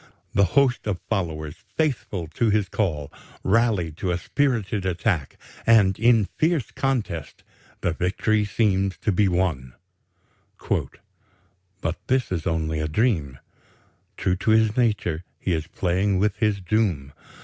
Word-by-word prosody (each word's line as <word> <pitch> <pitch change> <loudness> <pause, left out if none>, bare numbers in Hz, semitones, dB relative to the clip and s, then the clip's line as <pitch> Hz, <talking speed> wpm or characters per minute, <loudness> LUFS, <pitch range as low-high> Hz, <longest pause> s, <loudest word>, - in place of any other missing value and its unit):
The 100 0 +4
hosts 130 -5 +3
of 95 -4 -1
followers, 80 -6 -2 0.2
faithful 120 - -1
to 110 +8 +1
his 105 -2 +2
call, 75 -9 -2 0.3
rally 105 -5 +2
to 95 - -2
a 90 - +1
spirited 110 - 0
attack, 90 - -1 0.3
and 105 -5 +4
in 115 -2 +5
fierce 155 -6 +1
contest 105 - -2 0.4
the 85 - 0
victory 100 +5 +1
seems 100 -3 +1
to 105 - 0
be 100 +2 +3
won. 85 -9 -1 2.1
"But 85 -2 -2
this 130 -4 +1
is 85 -4 -2
only 80 -1 -1
a 75 - -1
dream. 80 - 0 0.8
True 90 0 0
to 105 - -1
his 110 0 +4
nature, 105 -9 0 0.2
he 95 - -1
is 80 -1 -2
playing 95 +3 0
with 100 +1 +1
his 105 -3 +1
doom. 90 -9 0
95 Hz, 135 wpm, -24 LUFS, 85-110 Hz, 2.1 s, in